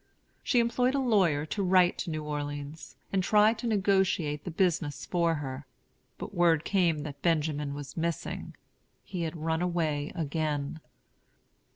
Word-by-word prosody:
She 250 - +1
employed 245 +3 +2
a - - +2
lawyer 190 - +2
to 200 +6 -3
write 185 -1 +4
to - - -3
New 155 -1 -3
Orleans, 145 -2 -5 0.2
and 190 - +3
try 210 +3 +5
to 230 +1 -5
negotiate 190 -8 +1
the - - -3
business 160 -5 0
for 170 -2 +1
her. 140 -1 -6 0.5
But - - -7
word 170 -4 +3
came 170 -7 +2
that 140 -2 -8
Benjamin 150 -4 0
was 145 -2 -8
missing; 165 -1 -3 0.5
he 185 -2 -5
had 165 0 -3
run 160 +1 -1
away 160 -5 -1
again. 155 -1 -2
165 Hz, 150 wpm, -29 LUFS, 145-185 Hz, 0.5 s, try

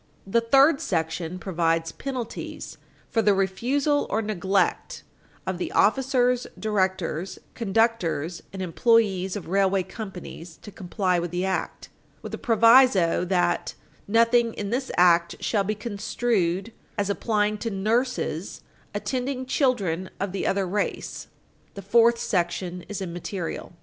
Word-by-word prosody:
The 230 +4 +2
third 275 +5 +4
section 160 +2 -2
provides 165 -3 0
penalties 255 -1 -6 0.3
for 225 - +2
the 205 -2 +3
refusal 260 - 0
or 220 +2 0
neglect 195 -2 -1 0.4
of 190 -2 -3
the - - -3
officers, 250 +1 +2
directors, 190 -4 -1 0.2
conductors, 195 -7 0
and 190 -1 -5
employees 195 0 +2
of 205 - -6
railway 195 +1 +2
companies 180 -4 -9
to 210 - -9
comply 185 -1 -1
with 175 +1 -3
the 180 +2 -2
act, 190 0 -3 0.3
with - - -7
a - - -4
proviso 230 -6 +5
that 175 -1 0 0.3
"nothing 230 +2 +3
in 205 0 -4
this 260 +2 -2
act 170 -1 +4
shall 205 -3 0
be 215 +2 -2
construed 210 -2 -1 0.3
as 200 0 0
applying 210 0 0
to 230 - -2
nurses 215 - -1 0.3
attending 255 +4 -2
children 200 - 0
of 195 0 -2
the 195 - -2
other 195 0 +1
race." 205 +3 -3 0.5
The 200 - -8
fourth 230 +4 +4
section 180 -3 -2
is 205 -2 -4
immaterial. 175 0 -5
200 Hz, 130 wpm, -25 LUFS, 180-230 Hz, 0.5 s, proviso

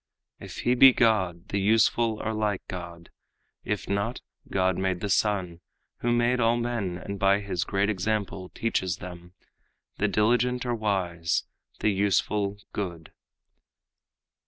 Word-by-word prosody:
If - - -8
he 125 - +2
be 130 +1 +8
God, 95 -7 +1
the 100 - 0
useful 110 +2 +3
are 110 - -1
like 105 -3 -1
God; 85 -2 -8 0.5
If 105 -2 -3
not, 100 +5 -1 0.3
God 95 -1 +1
made 95 -1 -1
the 100 - -3
sun, 95 -5 0 0.4
who 120 - 0
made 120 +1 +2
all 115 0 +3
men 115 -7 -2
And 100 +2 -6
by 100 +1 +4
his 95 -4 -2
great 100 +1 0
example 100 -2 -2
teaches 95 -7 -1
them 90 0 -10 0.6
The 100 - +1
diligent 120 +5 +1
are 120 - 0
wise, 90 -7 -1 0.4
the 110 - +3
useful 100 +1 +1 0.2
good." 85 -5 -5
100 Hz, 135 wpm, -27 LUFS, 90-110 Hz, 0.6 s, be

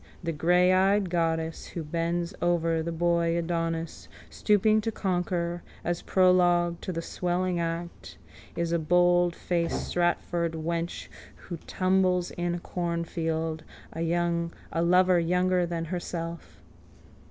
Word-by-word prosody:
The 165 -1 -2
greyeyed 185 +4 +3
goddess 165 -1 -1
who 170 - -5
bends 170 +2 -2
over 165 -2 +1
the 170 +1 -3
boy 170 0 +1
Adonis, 165 -1 -3 0.2
stooping 215 +1 +3
to 225 +1 -2
conquer, 175 -3 -1 0.2
as 175 0 -2
prologue 175 -2 +3
to - - -4
the 165 -1 -4
swelling 180 0 -1
act, 170 +1 -5 0.4
is 170 -1 -1
a 170 - +2
boldfaced 175 0 +2 0.2
Stratford 175 -1 0
wench 165 +1 -3 0.3
who 175 - -8
tumbles 185 -1 +1
in 175 0 -2
a - - -4
cornfield 165 -2 -2 0.3
a 170 0 -2
lover 180 +1 +4
younger 180 +1 +1
than 165 -1 -3
herself. 170 -1 -6
170 Hz, 115 wpm, -27 LUFS, 165-180 Hz, 0.4 s, lover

